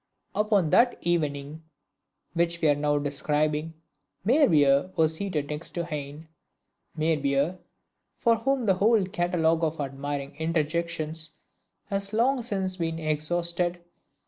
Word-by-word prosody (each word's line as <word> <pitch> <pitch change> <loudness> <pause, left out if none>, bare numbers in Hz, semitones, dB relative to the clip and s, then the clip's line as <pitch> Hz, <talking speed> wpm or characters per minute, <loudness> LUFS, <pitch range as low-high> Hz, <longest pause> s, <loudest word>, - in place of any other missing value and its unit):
Upon 205 -7 +2
that 245 0 +4
evening 150 -3 -1 0.7
which 170 0 0
we 160 - +3
are - - +6
now 145 0 +1
describing, 150 +2 -1 0.5
Meyerbeer 165 - +4
was 160 -1 +3
seated 160 -5 -3
next 150 +2 -6
to 170 -1 -1
Heine; 150 0 -6 0.7
Meyerbeer, 155 +1 +1 0.6
for 230 -2 +3
whom 260 +2 0
the 195 - +4
whole 210 +2 +3
catalogue 175 -4 +1
of 160 0 -1
admiring 140 0 -4
interjections 160 0 -2 0.5
has 200 0 -2
long 250 +4 +2
since 190 -5 -2
been 165 -2 -2
exhausted! 170 +3 -1
165 Hz, 120 wpm, -27 LUFS, 150-185 Hz, 0.7 s, are